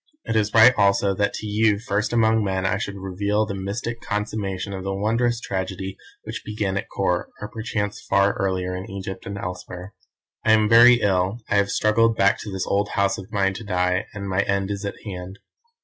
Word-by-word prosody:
It - - -3
is 105 -1 +2
right 115 +3 +8
also 100 0 +3
that 100 +1 0
to - - -6
you 105 0 +2
first 105 0 -1
among 110 -2 +3
men 95 -1 -1
I 95 +1 +1
should 100 0 -4
reveal 100 +3 -1
the 100 - -5
mystic 105 +5 -4
consummation 105 -2 -3
of 95 -1 -5
the 95 0 -2
wondrous 115 +4 +1
tragedy 95 -2 -4 0.3
which - - -6
began 105 -2 -2
at 100 - -3
Kôr, 90 -2 0
or 105 - -5
perchance 110 -2 -3
far 100 +1 +3
earlier 90 -1 -1
in 95 +1 -6
Egypt 95 -1 -6
and 100 0 -5
elsewhere. 90 +1 -7 0.5
"I 110 - +4
am 110 -1 +4
very 120 +2 +7
ill; 95 +3 +1
I 105 - +4
have 100 0 +2
struggled 110 +2 +2
back 100 0 +3
to 105 - -7
this 95 -1 -3
old 100 +1 0
house 100 0 +1
of 95 +2 -11
mine 95 -2 +1
to 110 +4 -7
die, 90 0 0
and 100 -1 -6
my 95 0 +1
end 100 0 -1
is 100 0 -4
at 100 - -4
hand. 95 -1 -7
100 Hz, 205 wpm, -23 LUFS, 95-110 Hz, 0.5 s, right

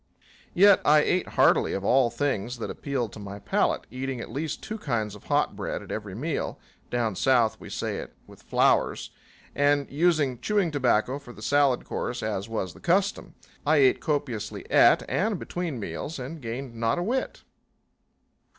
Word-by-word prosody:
Yet 200 +2 +7
I 150 +1 +6
ate 180 +4 +1
heartily - - +4
of 95 - -3
all 125 +1 +4
things 125 -4 -2
that 115 - -4
appealed 130 -7 -3
to - - -9
my 100 -1 -7
palate, 100 - 0
eating 130 0 -4
at - - -7
least 155 +4 -4
two 220 0 -5
kinds 115 - -2
of 105 - -13
hot - - +1
bread - - -4
at - - -10
every 105 -3 -5
meal 145 +7 -3 0.3
down 115 -4 -1
South 115 -2 +2
we - - -10
say - - -3
it - - -8
with - - -16
flours - - +1 0.4
and 145 0 +2
using 150 -5 +2
chewing 195 +4 +1
tobacco 130 -1 +1
for 125 -4 -12
the 110 - -12
salad 140 -2 +2
course, 125 - -4
as 105 -1 -3
was 95 -6 -3
the - - -15
custom. 195 +3 0 0.3
I 155 +2 +3
ate 135 -2 +4
copiously 120 -8 -3
at - - +5
and 205 0 0
between 170 -7 -4
meals 150 +9 -5
and 140 +5 -7
gained 120 +2 -5
not 115 0 0
a 175 - -1
whit. 255 +7 -2
130 Hz, 175 wpm, -26 LUFS, 115-155 Hz, 0.4 s, Yet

